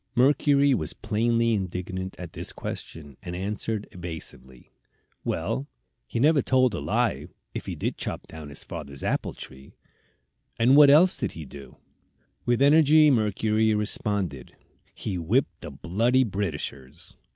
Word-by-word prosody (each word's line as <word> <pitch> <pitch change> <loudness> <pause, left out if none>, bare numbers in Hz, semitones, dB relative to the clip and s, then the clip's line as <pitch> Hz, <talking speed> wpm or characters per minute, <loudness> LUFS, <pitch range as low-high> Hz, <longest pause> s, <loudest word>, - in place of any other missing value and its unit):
Mercury 140 +2 +4
was 80 -11 -2
plainly 115 +2 +1
indignant 95 -1 -4
at 90 -2 -8
this - - -4
question, 75 -5 -7
and 90 -3 -6
answered, 105 +3 -3
evasively: 80 -7 -8 0.5
"Well, 65 +3 -2 0.4
he 115 - -3
never 145 +2 +4
told 130 -3 +2
a - - -3
lie, - - 0 0.3
if - - -6
he - - -3
did - - -3
chop - - -4
down 80 -2 -10
his 70 - -8
father's 70 -5 -7
apple - - -1
tree." 65 +1 -12 0.8
"And 120 +4 +5
what 145 -1 +8
else 170 +6 +6
did - - -3
he 80 - -8
do?" 70 +1 -12 0.7
With 120 +2 +3
energy 155 +1 +6
Mercury 110 -1 +2
responded: 100 - -2 0.4
"He 95 -4 -4
whipped 110 - 0
the - - -7
bloody 120 +8 +1
Britishers." 80 - -5
105 Hz, 140 wpm, -26 LUFS, 80-125 Hz, 0.8 s, what